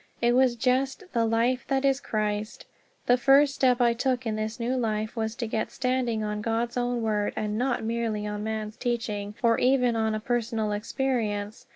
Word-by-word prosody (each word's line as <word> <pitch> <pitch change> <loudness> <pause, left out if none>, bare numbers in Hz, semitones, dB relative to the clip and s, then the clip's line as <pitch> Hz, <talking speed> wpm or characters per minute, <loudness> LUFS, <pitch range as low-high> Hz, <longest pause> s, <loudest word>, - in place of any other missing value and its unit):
It 240 0 +3
was 255 -1 +4
just 260 - 0
"the 230 -2 +2
Life 235 +3 +1
that 270 0 +1
is 270 -1 +3
Christ." 215 -2 -3 0.4
The 245 - +4
first 275 +2 +5
step 255 -2 +2
I 240 -1 +4
took 250 +1 -1
in 220 -1 -1
this 215 +1 -4
new 240 +2 -1
life 220 -2 -1
was 220 -1 -2
to 235 - -3
get 220 0 -2
standing 250 -4 -1
on 210 0 -3
God's 230 +2 -1
own 245 -1 -1
Word, 210 -2 0
and 210 -1 -2
not 245 +1 0
merely 225 -2 -2
on 210 0 -4
man's 220 0 -4
teaching 215 -5 -3
or 230 -1 +4
even 250 -2 +3
on 220 -1 0
a - - -2
personal 225 -2 -1
experience. 210 -2 -2
230 Hz, 190 wpm, -27 LUFS, 215-250 Hz, 0.4 s, first